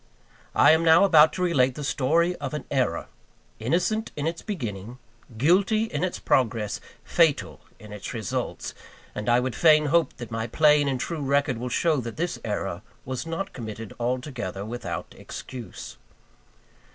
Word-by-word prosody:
I - - +7
am 160 +1 +4
now 165 +3 +6
about 160 -5 +7
to 185 - -2
relate 135 -8 +2
the 150 - -5
story 165 +6 +1
of 140 0 -4
an 150 - -5
error, 125 -11 0 0.5
innocent 180 - 0
in 145 - -3
its 165 0 -2
beginning, 120 - -5 0.4
guilty 195 - +3
in 160 -8 -3
its 185 - -1
progress, 115 -4 0 0.2
fatal 165 -4 +1 0.2
in 105 0 -11
its 105 - -6
results; 110 -5 -4 0.4
and 105 +2 -3
I 120 +1 +5
would 125 0 -2
fain 155 -2 +5
hope 165 +2 +2
that 120 -3 -8
my 115 0 -2
plain 150 +3 +4
and 130 -2 -1
true 165 +3 -3
record 140 -3 +1
will 125 +1 -3
show 160 +5 +2
that 115 -3 -5
this 175 +2 -2
error 100 -4 -3 0.2
was 130 +4 -4
not 190 +4 -4
committed 110 -2 -7
altogether 120 -6 -3
without 120 +3 -5
excuse. 125 -3 -9
135 Hz, 160 wpm, -25 LUFS, 115-165 Hz, 0.5 s, I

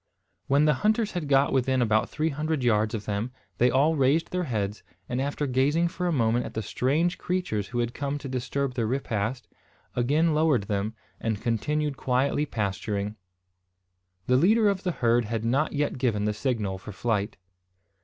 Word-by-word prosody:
When 140 +2 +4
the 150 - +5
hunters 215 0 +2
had 175 -5 -3
got 140 0 +3
within 130 0 +2
about 110 -1 +2
three 155 +1 -1
hundred 155 -1 -2
yards 110 -1 +2
of 105 - -5
them, 105 +4 -2 0.3
they 125 - +5
all 145 +6 +3
raised 140 +3 +2
their 180 -1 -1
heads, 105 -5 -2 0.3
and, 125 +1 -1
after 145 +1 -1
gazing 145 +6 +2
for 180 +1 -3
a - - +1
moment 120 -4 +2
at - - -8
the 110 - -2
strange 150 - 0
creatures 175 - -2
who 120 - -5
had 120 0 0
come 140 0 -2
to 145 - -7
disturb 130 +1 -2
their 115 -3 -1
repast, 120 -1 -2 0.5
again 150 +7 +2
lowered 150 -7 +3
them, 100 +2 -2 0.2
and 110 -2 -2
continued 140 +6 -1
quietly 135 +4 +1
pasturing. 105 -1 -2 1.1
The 125 +4 +3
leader 210 - +4
of 195 -2 -1
the 180 - -1
herd 120 -5 +2
had 115 +1 -3
not 135 +6 +1
yet 145 -3 -1
given 110 -5 +1
the 105 - +1
signal 105 -5 -2
for 105 - -9
flight. 105 0 -1
130 Hz, 180 wpm, -27 LUFS, 110-150 Hz, 1.1 s, the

